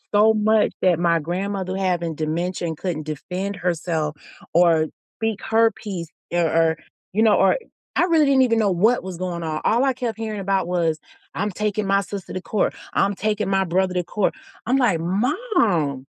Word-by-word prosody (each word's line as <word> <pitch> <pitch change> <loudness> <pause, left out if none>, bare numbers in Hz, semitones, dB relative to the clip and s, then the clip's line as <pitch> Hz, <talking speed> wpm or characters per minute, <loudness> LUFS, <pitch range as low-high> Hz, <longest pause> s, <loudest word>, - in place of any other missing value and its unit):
so 215 +2 +6
much 215 0 +3
that 180 -3 +4
my 170 0 +2
grandmother 185 +3 -3
having 175 -4 -1
dementia 170 +3 -2
and 160 - -5
couldn't 170 -4 -3
defend 185 +6 -4
herself 165 -4 -1 0.4
or 165 -2 +4 0.3
speak 225 -2 -2
her 225 0 +4
piece 185 -8 -6 0.2
or 175 - +1
or, 165 0 +2 0.3
you 210 - +1
know, 220 -2 +5
or - - +4 0.4
I - - +5
really 330 -4 +4
didn't 270 -2 +4
even 230 -2 +2
know 210 - +3
what 210 +7 +3
was 185 -2 -7
going 180 -2 -3
on. 155 -2 -2
All 235 +3 +3
I 275 - +3
kept 235 -3 -4
hearing 215 -2 -3
about 195 -2 0
was, 165 -3 0 0.3
"I'm 205 +2 -1
taking 210 +1 -2
my 195 0 +3
sister 195 -1 -7
to 185 - -3
court. 205 +2 -1 0.2
I'm 200 0 +2
taking 215 -1 -1
my 195 0 +2
brother 185 +1 0
to 180 - +1
court." 205 +3 -1 0.3
I'm 255 - +3
like, 235 -11 +2
"Mom, 190 - 0
190 Hz, 185 wpm, -22 LUFS, 170-215 Hz, 0.4 s, so